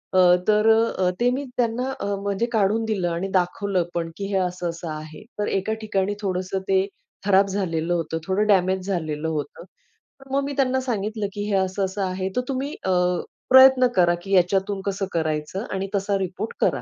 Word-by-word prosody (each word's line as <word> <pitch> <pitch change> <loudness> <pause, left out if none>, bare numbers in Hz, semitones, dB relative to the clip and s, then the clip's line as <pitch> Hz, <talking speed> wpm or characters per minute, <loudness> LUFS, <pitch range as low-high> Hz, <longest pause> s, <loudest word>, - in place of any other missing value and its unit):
अ, 185 - +6 0.3
तर 215 +1 +4
अ, 225 -4 +3
अ, - - +4
ते 245 - +3
मी 275 - -2
त्यांना 245 +2 0
अ, - - -3 0.2
म्हणजे 200 +3 0
काढून 215 +1 +2
दिलं 195 -6 -1
आणि 170 +3 -2
दाखवलं 185 0 +1
पण, 165 -1 -2
की 200 - -4
हे 195 - +1
असं 180 -1 -1
असं 165 0 -6
आहे. 155 +2 -8 0.2
तर 205 - 0
एका 195 +3 -1
ठिकाणी 205 -2 0
थोडंसं 185 0 -2
ते 190 0 +3 0.4
खराब 200 0 +4
झालेलं 175 -4 -1
होतं, 165 -1 -2
थोडं 205 +3 +1
डॅमेज 190 -2 +2
झालेलं 160 -4 -2
होतं. 150 0 -4 0.7
मग 275 +1 +1
मी 285 - -3
त्यांना 260 -1 +2
सांगितलं, 215 -3 -2
की 205 - -4
हे - - +2
असं 190 +1 0
असं 190 +2 -4
आहे, 185 0 -2
तर 250 - +2
तुम्ही 270 +2 -2
अ, 190 - +1 0.6
प्रयत्न 260 0 +8
करा, 175 -1 +4
की 195 - -7
याच्यातून 195 +2 +2
कसं 195 0 -1
करायचं 155 +4 -2
आणि 195 0 -2
तसा 200 0 0
रिपोर्ट 190 +4 -4
करा. - - +2
195 Hz, 190 wpm, -23 LUFS, 180-215 Hz, 0.7 s, प्रयत्न